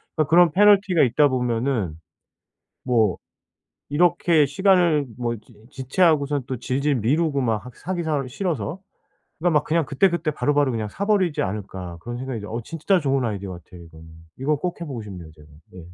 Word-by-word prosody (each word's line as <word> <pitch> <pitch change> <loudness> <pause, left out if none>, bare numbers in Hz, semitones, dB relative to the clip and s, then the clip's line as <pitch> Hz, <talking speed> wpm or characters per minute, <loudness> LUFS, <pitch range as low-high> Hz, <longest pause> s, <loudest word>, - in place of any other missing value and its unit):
그러니까 155 -3 0
그런 170 -1 +6
패널티가 195 -2 +4
있다 140 +4 +3
보면은 120 - -1 0.9
뭐 115 -7 +2 0.7
이렇게 165 0 +3
시간을 170 -3 +3
뭐 120 -1 -2
지 110 +3 -20 0.2
지체하고선 145 0 +1
또 130 - -3
질질 135 +4 -1
미루고 140 +5 +1
막 115 -2 -1
하 125 - -9
사기 175 0 -4
사 150 -4 -1
싫어서. 155 - -3 0.6
그러니까 165 -3 +3
막 - - -10
그냥 165 0 +1
'그때그때 170 +2 +1
바로바로 145 -2 +1
그냥 110 -2 -3
사버리지 195 - 0
않을까?' 95 -3 -6
그런 120 +4 -6
생각이 125 -5 -5
어 115 +3 -4
진짜 165 - 0
좋은 135 -3 0
아이디어 100 -4 -4
같아요, 85 0 -13
이거는. 80 0 -15 0.3
이건 150 +3 0
꼭 175 +4 -4
해보고 135 -8 -5
싶네요, 90 -6 -10
제가. 75 -1 -18 0.3
네. 90 - -10
140 Hz, 375 characters per minute, -23 LUFS, 115-165 Hz, 0.9 s, 그런